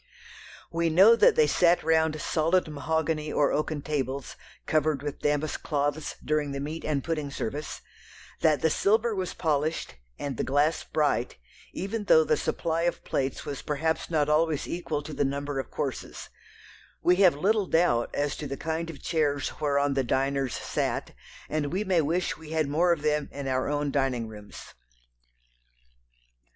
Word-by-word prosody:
We 170 0 +1
know 195 +8 +7
that 475 - +5
they 465 - +5
sat 175 - +3
round 160 -1 +2
solid 165 +4 +1
mahogany 155 +1 -1
or 145 - +2
oaken 150 -1 -1
tables, 140 -2 -3 0.3
covered 155 -3 +1
with 145 -1 -4
damask 150 +1 -1
cloths 145 0 -1
during 150 -2 0
the 140 - -3
meat 155 +4 -5
and 145 -3 -1
pudding 155 -4 -2
service, 140 +2 -5 0.6
that 155 -1 +2
the 160 - +4
silver 220 +6 +2
was 185 -3 -3
polished, 155 - -1 0.2
and 140 -4 -4
the - - -1
glass 145 +4 +1
bright, 145 -6 0 0.3
even 205 +2 -4
though 160 -5 +6
the 155 - +2
supply 165 +2 -1
of - - -10
plates 135 -1 -2
was 140 -2 -5
perhaps 160 +2 -1
not 155 -3 +1
always 155 0 +1
equal 160 -4 -3
to 155 +1 -7
the - - 0
number 140 0 -2
of 130 - -5
courses; - - -5 0.7
we 180 +1 +4
have 185 -5 +6
little 200 +5 +1
doubt 140 -9 +2
as 145 0 -1
to 150 - -5
the 140 0 -5
kind 160 +2 -3
of 145 -5 -10
chairs 145 -4 0
whereon 140 -1 +2
the 135 -1 +1
diners 135 0 0
sat, - - -2 0.4
and 150 -2 -2
we 190 +4 0
may 185 -4 +2
wish 170 +5 -1
we 160 -1 -12
had 155 -2 +1
more 165 +5 +2
of 160 -4 0
them 150 -1 0
in 140 -1 -5
our 130 +1 0
own 145 -1 -1
dining 130 -4 0
rooms. 105 -2 -11
150 Hz, 165 wpm, -27 LUFS, 140-165 Hz, 0.7 s, know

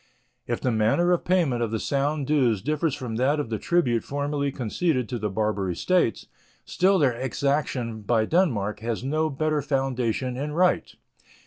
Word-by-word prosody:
If 120 - -1
the 125 - 0
manner 115 +11 +2
of 175 - +1
payment 165 -10 +2
of 115 - 0
the 110 0 -2
Sound 140 +3 -1
dues 125 -9 +2
differ 155 +4 0
from 125 -5 -5
that 140 +5 +2
of 120 -6 -4
the 110 - -1
tribute 125 -10 +1
formerly 145 0 -2
conceded 130 +2 -1
to 120 - -3
the 105 0 -2
Barbary 100 -3 -1
States, 180 - +1 0.4
still 190 +2 +2
their 140 -7 +3
exaction 130 -3 -2
by 110 +1 +1
Denmark 110 - +1
has 115 +1 -3
no 155 +4 0
better 155 +1 0
foundation 130 -3 -1
in 150 +2 -3
right. 180 +3 +1
135 Hz, 165 wpm, -25 LUFS, 115-150 Hz, 0.4 s, their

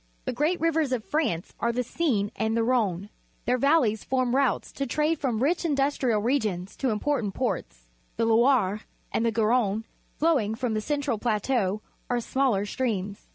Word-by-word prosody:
The - - -2
great 305 +8 +1
rivers 320 -3 +1
of 235 -4 -2
France 280 - -1
are 235 - +1
the 250 +2 -1
Seine_ 230 -7 0
and 220 +1 0
the 230 - +2
Rhone. 210 -6 0 0.4
Their 250 +1 +1
valleys 270 -7 +3
form 255 -1 0
routes 275 -2 +1
of 275 - +1
trade 305 +4 +1
from 245 -4 0
rich 335 +6 +1
industrial 275 -7 +1
regions 215 -8 -1
to 265 - 0
important 220 -2 -1
ports. - - -3 0.3
The 230 - +2
Loire, 225 -3 +3 0.3
and - - 0
the 230 - +2
Garonne, 220 -1 +1 0.3
flowing 275 -10 +2
from 245 -1 -2
the 215 - 0
central 285 -3 -1
plateau, 215 -2 0 0.3
are 245 -1 +1
smaller 240 -4 +1
streams. 205 -4 -3
240 Hz, 165 wpm, -26 LUFS, 215-275 Hz, 0.4 s, valleys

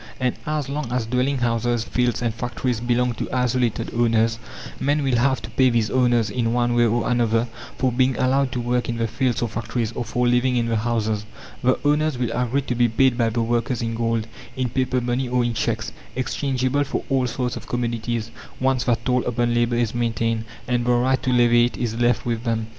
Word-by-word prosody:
And 125 -2 +1
as 150 -2 -1
long 140 -3 -4
as 125 -2 0
dwelling 125 +4 0
houses, 120 -1 0
fields, 125 0 0
and 115 -2 0
factories 120 0 -2
belong 120 +1 +1
to - - -5
isolated 125 -2 0
owners, 115 -1 +2 0.4
men 145 +1 +1
will 130 -3 +2
have 130 +2 +1
to - - -8
pay 130 -1 +4
these 115 -3 +1
owners, 120 -4 +2
in 115 -1 0
one 120 0 +1
way 120 0 +4
or 115 +2 0
another, 120 -1 +2 0.3
for 130 -1 +1
being 130 +1 +2
allowed 130 +1 +2
to 125 - -2
work 120 +1 -1
in 115 - -2
the 115 - 0
fields 120 +1 0
or - - +1
factories, 115 0 -3
or 120 - -3
for 125 +2 0
living 125 +1 +2
in 120 -1 +1
the 115 -1 0
houses. 110 -2 -1 0.3
The 130 +1 +3
owners 150 -1 +2
will 125 -2 -1
agree 125 +3 0
to 130 - -2
be 120 0 +2
paid 130 +3 +3
by 115 -2 +2
the 115 +1 -1
workers 120 +1 -1
in 115 0 -2
gold, 115 -1 0 0.3
in 130 -1 -1
paper 130 0 0
money, 120 +1 -1
or 125 0 +2
in 120 - -1
cheques - - -2 0.2
exchangeable 130 +1 0
for 140 - -3
all 130 -2 +1
sorts 125 +1 -2
of - - -8
commodities, 120 -1 -2 0.3
once 130 -2 +1
that 115 -1 0
toll 125 -1 +2
upon 120 0 0
labour 120 0 +1
is 120 -2 0
maintained, 115 -1 -1 0.2
and 120 -1 +1
the 125 0 +2
right 130 +2 +2
to 130 - 0
levy 120 -1 +5
it 120 - -4
is 120 -3 -2
left 120 0 +1
with 115 -1 -2
them. 115 -2 -1
120 Hz, 215 wpm, -23 LUFS, 115-125 Hz, 0.4 s, levy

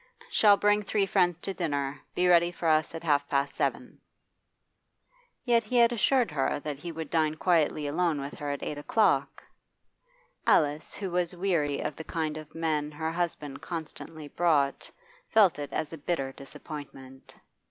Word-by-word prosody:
'Shall 205 -2 +6
bring 205 +1 +3
three 205 0 0
friends 180 -3 +2
to 195 +2 -5
dinner. 145 -6 -2
Be 180 - +2
ready 175 -1 +5
for 170 -1 -4
us 155 +1 +2
at 165 - -6
half 145 -3 +1
past 140 0 0
seven.' - - -2 1.5
Yet 235 -2 +3
he 245 +3 -1
had 235 0 +6
assured 245 - +2
her 140 -2 0
that 145 -2 -5
he 170 +3 -6
would 160 -2 -7
dine 155 -2 +2
quietly 155 -3 +1
alone 160 +1 0
with 140 +1 -6
her 145 - -4
at 140 - -3
eight 150 - -4
o'clock. 150 -4 +1 1.0
Alice, 150 0 +2
who 195 -3 -4
was 180 0 0
weary 170 -6 0
of 150 - -3
the 160 - -6
kind 155 -2 -3
of 155 0 -11
men 155 -2 -1
her 160 +2 -3
husband 165 -5 -3
constantly 160 -2 -7
brought, 145 -4 +1 0.4
felt 200 -8 +4
it 145 -1 -5
as 155 - -3
a 165 - -7
bitter 140 -4 -2
disappointment. 135 -1 -10
160 Hz, 165 wpm, -28 LUFS, 145-180 Hz, 1.5 s, Shall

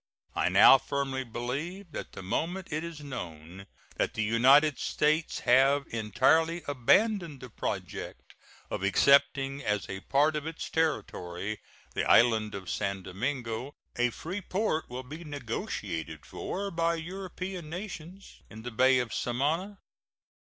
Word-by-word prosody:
I - - +1
now 135 - +8
firmly 135 -1 -2
believe 145 - -5
that - - -7
the - - -8
moment 170 - -2
it 155 +2 -1
is 170 -3 -7
known 90 - -8 0.3
that - - 0
the 110 - 0
United 130 +7 +5
States 155 +2 0
have 135 +3 +4
entirely 160 - +2
abandoned 170 - +2
the 125 -3 -10
project - - -5 0.4
of - - -3
accepting 140 +6 +3
as 105 -4 -1
a 95 - -5
part 145 +8 +2
of 150 +1 -3
its 160 0 -6
territory 105 - -2 0.3
the - - -1
island 110 -3 +4
of 95 -1 -7
San 100 -2 -2
Domingo 120 +5 -3 0.2
a 120 0 +2
free 175 - -5
port 185 -4 -1
will 125 +1 -5
be 155 +6 -9
negotiated 110 - -5
for 200 +1 -4
by 170 0 +1
European 185 0 -6
nations 180 +1 -8
in 110 0 -10
the 120 - -5
Bay 130 +3 +4
of 125 -3 -1
Samana. 155 +11 -1
140 Hz, 135 wpm, -29 LUFS, 115-165 Hz, 0.4 s, now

